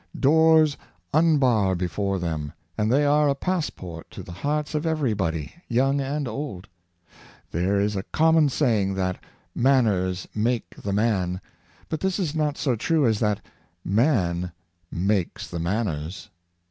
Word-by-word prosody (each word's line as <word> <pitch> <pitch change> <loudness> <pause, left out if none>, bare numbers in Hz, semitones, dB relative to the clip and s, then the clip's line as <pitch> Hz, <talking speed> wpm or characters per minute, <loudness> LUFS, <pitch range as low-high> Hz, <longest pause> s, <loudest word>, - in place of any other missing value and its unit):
Doors 155 +1 +5 0.4
unbar 130 - +3
before 95 +3 -1
them, 80 -4 -3 0.2
and 105 +4 0
they 145 +3 +4
are 145 0 +4
a 140 - +1
pass 180 +2 -1
port 85 -3 -9
to - - -9
the - - -10
hearts 145 - -2
of 150 0 -1
every 155 -8 +1
body, 80 -6 -2
young 135 +3 +2
and 140 +1 -2
old. 110 -6 -5 0.8
There 95 +4 +1
is 105 +1 0
a 95 - -1
common 160 +5 +3
saying 110 -9 +1
that 95 -1 -1
'^ - - -28 0.3
Manners 105 -9 +2
make 115 +3 -1
the 100 - -5
man; 95 -4 +1 0.3
" - - -30
but 160 - -3
this 190 +1 0
is 175 -7 -1
not 150 -2 0
so 135 -5 +1
true 155 +6 +1
as 110 -3 +2
that 105 -2 0 0.3
" 85 +1 -45 0.2
Man 90 - 0 0.4
makes 95 0 -1
the 85 - -5
manners.'' 90 0 -3
110 Hz, 160 wpm, -25 LUFS, 95-145 Hz, 0.8 s, Doors